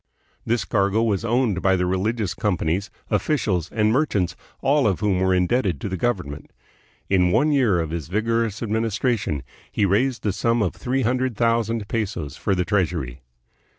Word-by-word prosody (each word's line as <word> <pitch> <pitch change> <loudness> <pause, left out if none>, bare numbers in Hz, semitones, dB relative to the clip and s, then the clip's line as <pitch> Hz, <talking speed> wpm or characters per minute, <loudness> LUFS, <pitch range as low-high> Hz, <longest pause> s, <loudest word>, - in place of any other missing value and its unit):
This 115 -5 +1
cargo 100 +3 +1
was 105 -3 0
owned 115 -5 +1
by 95 -1 +3
the 90 0 0
religious 100 +3 -1
com 105 -4 0
panies, 90 +7 -1 0.2
officials, 105 - 0
and 110 -1 +2
merchants, 105 - +1 0.3
all 140 -3 +3
of 95 -4 0
whom 100 -4 +1
were 95 0 +2
in 90 -1 +2
debted 100 - +1
to - - -3
the 95 - -2
government. 90 -9 -2 0.6
In 90 -2 +3
one 135 +11 +3
year 120 -11 +3
of 80 -2 -2
his 80 -3 -4
vigorous 110 +3 -1
administration 110 - -1 0.3
he 105 - +1
raised 115 +6 +1
the 105 - 0
sum 115 +3 +1
of 90 - -1
three 130 +1 -1
hundred 125 0 0
thou 115 +1 +2
sand 115 -2 -3
pesos 100 -9 -3
for 100 +3 0
the 90 -1 0
treasury. 85 -10 -1
105 Hz, 180 wpm, -23 LUFS, 90-115 Hz, 0.6 s, by